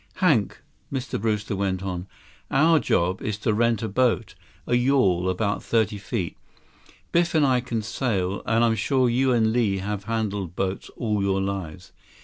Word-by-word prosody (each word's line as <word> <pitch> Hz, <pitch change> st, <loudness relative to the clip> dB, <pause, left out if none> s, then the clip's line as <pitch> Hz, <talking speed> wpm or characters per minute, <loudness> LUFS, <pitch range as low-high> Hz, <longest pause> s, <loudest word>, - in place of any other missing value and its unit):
"Hank," 145 Hz, -, +1 dB, 0.3 s
Mr. 135 Hz, -6 st, -3 dB
Brewster 105 Hz, -2 st, -1 dB
went 95 Hz, -1 st, -1 dB
on, 90 Hz, -1 st, -4 dB, 0.4 s
"our 160 Hz, +3 st, +4 dB
job 90 Hz, -5 st, 0 dB
is 105 Hz, -1 st, -2 dB
to 110 Hz, +1 st, 0 dB
rent 115 Hz, 0 st, +1 dB
a -, -, -1 dB
boat. 115 Hz, 0 st, +1 dB, 0.3 s
A -, -, -2 dB
yawl, 120 Hz, -8 st, +3 dB
about 100 Hz, +3 st, -1 dB
thirty 110 Hz, -2 st, 0 dB
feet. 90 Hz, -3 st, -3 dB, 0.8 s
Biff 170 Hz, -1 st, +2 dB
and 155 Hz, -2 st, +5 dB
I 130 Hz, -2 st, +3 dB
can 120 Hz, -3 st, -3 dB
sail, 100 Hz, -5 st, -1 dB
and 115 Hz, +1 st, +3 dB
I'm 115 Hz, -1 st, +3 dB
sure 125 Hz, +4 st, +1 dB
you 130 Hz, +2 st, +2 dB
and 110 Hz, -2 st, +2 dB
Li 110 Hz, -5 st, +1 dB
have 100 Hz, +1 st, -4 dB
handled 105 Hz, -6 st, -2 dB
boats 95 Hz, 0 st, -3 dB
all 105 Hz, -4 st, 0 dB
your 95 Hz, 0 st, +1 dB
lives. 90 Hz, -4 st, -4 dB
110 Hz, 165 wpm, -24 LUFS, 95-120 Hz, 0.8 s, and